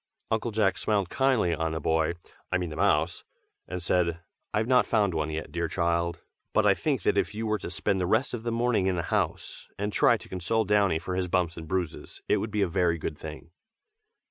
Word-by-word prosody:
Uncle 110 +1 0
Jack 105 -3 +1
smiled 100 -4 0
kindly 130 -10 +2
on 80 0 -1
the 80 - -2
boy 80 +2 +1 0.4
I 90 - +3
mean 90 -3 -3
the - - -6
mouse 85 -2 +1 0.4
and 90 -1 -5
said 85 -1 +1 0.3
"I - - -1
have 110 - +2
not 125 +1 +4
found 105 -5 +2
one 80 -1 -1
yet, 80 0 -5
dear 85 0 -1
child! 85 -1 -1 0.3
but - - +3
I - - +6
think - - -1
that - - +3
if - - -2
you 110 +1 -3
were 110 -1 0
to - - -6
spend 95 -2 0
the 90 - 0
rest 110 +7 +1
of 120 - -3
the 115 +1 -2
morning 115 -4 +1
in 95 - +1
the 85 - -1
house, - - -2
and 105 +1 -2
try - - +4
to - - -14
console 105 +5 0
Downy 100 -4 +3
for 90 +3 -5
his 90 -1 0
bumps 90 -2 0
and 80 -1 -8
bruises, 90 -2 -3
it - - +3
would 110 - -2
be 105 -1 +1
a - - +1
very 85 -1 +1
good 75 - -4
thing." 80 +1 -9
90 Hz, 230 wpm, -28 LUFS, 85-105 Hz, 0.4 s, I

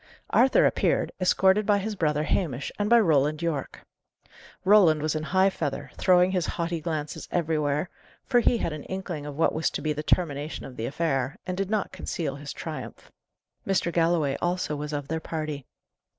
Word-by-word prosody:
Arthur 260 +2 +5
appeared, - - +1
escorted 190 +3 +4
by 205 0 +3
his 210 +2 -3
brother 150 -4 0
Hamish 145 -5 -1
and 205 0 0
by 235 0 +7
Roland 155 -4 +2
Yorke. 155 -5 -3 0.8
Roland 185 -6 +6
was 155 0 -1
in 155 - -2
high 190 +4 +2
feather, 145 -6 -4
throwing 180 -1 +4
his 180 -3 0
haughty 170 -1 -2
glances 155 -2 -4
everywhere, 155 -2 0 0.4
for 245 - +3
he 240 0 +3
had 170 - -2
an 155 - -7
inkling 180 -6 -5
of 145 - -6
what 165 - +2
was 160 - 0
to - - -4
be 155 -1 -1
the 150 - -4
termination 150 -2 -1
of 130 - -10
the 115 -1 -3
affair, 145 +1 -1
and 180 - -3
did 195 0 -2
not 215 -2 -1
conceal 140 -5 -4
his 145 0 -7
triumph. - - -8 0.6
Mr. 180 -3 +1
Galloway 165 -4 +2
also 175 -3 -1
was 150 +1 -5
of 145 -2 -4
their 160 0 -2
party. 155 -4 -5
160 Hz, 180 wpm, -26 LUFS, 150-185 Hz, 0.8 s, by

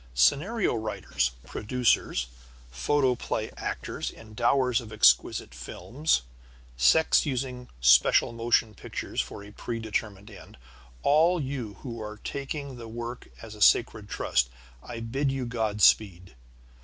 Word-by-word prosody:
Scenario 170 - +2
writers, 110 - -2
producers, 110 - 0 0.5
photoplay 130 - 0
actors, - - -4
endowers 120 +3 0
of 110 -2 -11
exquisite 85 -13 +3
films, 115 - -1 0.5
sects 160 - +4
using 125 -2 -3
special 60 - +5
motion 115 -1 +1
pictures 90 - -4
for 60 +11 -8
a 105 - -12
predetermined 110 -3 -4
end, - - -14 0.5
all 165 +5 +4
you 130 -7 -4
who 115 -3 -6
are 105 0 -7
taking 140 +2 -5
the 115 -1 -9
work 120 +2 -7 0.2
as 110 -2 -9
a 105 - -12
sacred - - +3
trust, - - 0 0.3
I 115 - -8
bid 135 +5 -1
you 135 -2 -3
God 110 -3 -2
speed. 90 -5 +3
115 Hz, 120 wpm, -27 LUFS, 105-130 Hz, 0.5 s, special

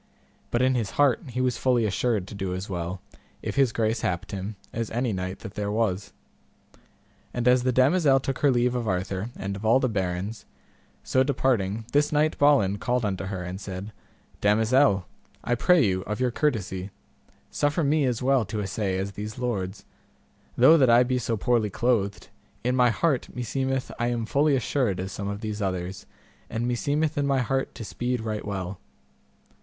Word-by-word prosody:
But 120 +1 +1
in 130 0 +3
his 115 -5 -1
heart 145 -4 +4
he 125 +1 -2
was 125 -2 0
fully 125 -3 +2
assured 105 -1 0
to - - -9
do 95 -2 -3
as 95 +2 -5
well, 90 0 -4 0.4
if - - -3
his 135 -4 +3
grace 110 0 0
happed 90 +1 -2
him, 100 +2 -5 0.2
as 115 -1 -2
any 120 -1 -1
knight 95 0 -4
that 110 - -8
there 100 -1 -3
was. 105 -3 -1 1.2
And 120 0 0
as 125 0 +5
the 130 +1 +1
damosel 135 +2 +4
took 135 0 -3
her 145 - +4
leave 125 -1 +2
of 120 -2 -2
Arthur 95 +2 -2
and 100 +1 -4
of 100 - -8
all 115 +4 +5
the 130 - +1
barons, 100 0 -3 0.6
so 130 - +2
departing, 115 -6 0
this 145 +1 +3
knight 155 +1 +2
Balin 130 -9 +4
called 125 -2 0
unto 95 -2 -2
her, 95 -2 -4
and 90 +2 -6
said, 95 +2 -6 0.5
Damosel, 110 -1 +3 0.4
I 120 - 0
pray 155 +4 +4
you 95 -2 0
of 105 0 -3
your 125 -1 +1
courtesy, 100 -9 -1 0.6
suffer 145 +3 +1
me 145 0 +2
as 125 -1 -1
well 135 -2 +3
to 105 +2 -4
assay 100 -1 -2
as 95 +1 -2
these 105 +3 -6
lords; 105 -6 -3 0.7
though 155 +7 +7
that 130 -3 +5
I 120 +1 +7
be 125 0 0
so 115 -1 -1
poorly 115 0 +1
clothed, 100 -2 0 0.3
in 125 +1 +1
my 125 -1 +5
heart 140 +3 0
meseemeth 130 +2 -2
I 120 - +1
am 120 -2 -1
fully 140 +4 +2
assured 125 -6 0
as 95 +1 -4
some 100 +2 -5
of 100 +1 -4
these 105 -1 -4
others, 95 -1 -3 0.4
and 115 +2 -2
meseemeth 145 +5 0
in 140 - +1
my 135 -1 +2
heart 135 +2 -1
to 115 - -7
speed 125 +2 -2
right 110 -1 -3
well. 95 -2 -4
115 Hz, 185 wpm, -26 LUFS, 100-130 Hz, 1.2 s, though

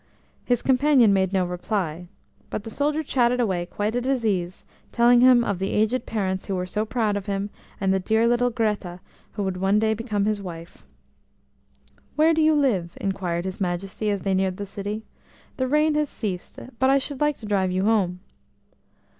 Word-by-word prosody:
His 245 -2 +1
companion 260 -5 +4
made 190 -1 +1
no 190 -2 +1
reply, 180 -2 -3 0.4
but 205 - -4
the 225 - -8
soldier 295 +5 0
chatted 250 -3 +1
away 185 -7 0
quite 205 +5 -2
at 245 - 0
his 260 -3 0
ease, 185 -3 -2 0.3
telling 240 +1 +5
him 250 -1 +6
of 200 -5 -2
the 195 - -1
aged 220 +4 0
parents 190 -4 -2
who 195 - -1
were 180 0 -2
so 210 +4 -2
proud 220 -2 0
of 205 0 -4
him, 200 0 -2 0.3
and 195 -1 +1
the 190 - +1
dear 220 +4 +2
little 240 +1 +2
"Greta" 210 -6 -2 0.3
who 205 - -3
would 190 -1 -2
one 195 +2 +2
day 220 0 +2
become 215 -2 -2
his 210 -1 0
wife. 170 -3 -9 1.3
"Where 315 +2 +4
do 320 - +2
you 310 0 +4
live?" 205 -13 0
inquired 180 -3 -2
his 190 +2 -5
Majesty 190 +3 -2
as 200 -2 -1
they 195 - 0
neared 190 -1 0
the 205 - -4
city. 205 +2 -5 0.5
"The 260 - 0
rain 300 +3 +3
has 300 -1 0
ceased, 190 -6 -5 0.2
but 260 - +3
I 275 - +5
should 275 0 -4
like 295 -1 +2
to 220 - -10
drive 195 -3 +1
you 185 +1 0
home." 190 -5 +1
210 Hz, 195 wpm, -24 LUFS, 190-245 Hz, 1.3 s, him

